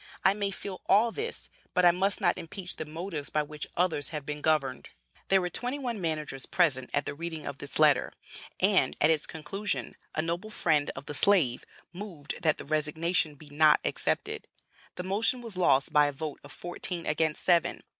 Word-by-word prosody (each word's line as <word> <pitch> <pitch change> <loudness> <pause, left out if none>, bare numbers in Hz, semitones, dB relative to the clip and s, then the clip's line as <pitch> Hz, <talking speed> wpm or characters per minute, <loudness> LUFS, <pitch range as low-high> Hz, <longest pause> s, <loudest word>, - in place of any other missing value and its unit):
I 190 - +6
may 200 -1 -1
feel 195 -1 -6
all 220 +4 +5
this, 445 - -4 0.3
but 180 -1 +4
I 175 - +8
must 190 +3 +1
not 175 -2 +3
impeach 180 +2 -5
the 155 - -5
motives 160 -1 -5
by 150 - +1
which 150 0 -7
others 170 -5 +1
have 150 -3 -5
been 150 0 -5
governed." 140 -5 0 0.4
There 195 - +4
were 180 -1 -2
twenty 250 +3 -2
one 240 -7 -4
managers 155 -5 -3
present 135 -8 +2
at 145 - 0
the - - -3
reading 160 +1 -5
of 140 -1 -6
this 140 - -3
letter, 150 -4 +4 0.5
and, 75 - +3
at 155 - +5
its 155 -2 +2
conclusion, 195 +7 -3 0.2
a 155 - 0
noble 170 +6 -3
friend 155 -8 +1
of 135 - -8
the 150 - -5
slave 145 -3 +3 0.3
moved 175 -6 -7
that 155 -4 +2
the - - -8
resignation 155 +2 +1
be 145 0 -14
not 150 +1 +5
accepted; - - -1 0.5
the 180 - -5
motion 210 +7 +4
was 230 -5 -6
lost 145 -5 +3
by 150 -1 +5
a - - -1
vote 150 +1 -6
of 145 - -12
fourteen 175 +1 -5
against 155 0 +1
seven. 175 -1 +2
160 Hz, 195 wpm, -29 LUFS, 150-185 Hz, 0.5 s, I